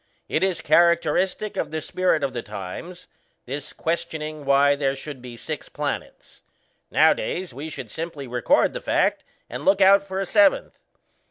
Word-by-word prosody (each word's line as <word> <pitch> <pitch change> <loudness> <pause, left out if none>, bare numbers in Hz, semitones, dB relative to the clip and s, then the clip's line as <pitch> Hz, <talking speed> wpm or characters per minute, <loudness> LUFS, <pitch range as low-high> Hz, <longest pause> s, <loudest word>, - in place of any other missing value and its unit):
It 155 - 0
is 190 -3 0
characteristic 170 +5 +2
of 155 - -1
the 155 +1 -3
spirit 170 -1 0
of 135 -2 -1
the 120 - -3
times 105 - -8 0.4
this 140 +2 -6
questioning 155 -2 -4
why 140 +1 +4
there 140 -1 0
should 135 -1 -8
be 120 -1 -9
six - - -6
planets. - - -6 0.5
Nowadays, 180 -5 +2
we 145 +5 -6
should - - -8
simply 160 -4 -5
record 125 -1 +2
the - - -5
fact - - +1 0.2
and - - -7
look 195 +1 +4
out 195 +1 +6
for 190 -1 -5
a 195 - -1
seventh. 300 - +3
155 Hz, 160 wpm, -24 LUFS, 140-180 Hz, 0.5 s, out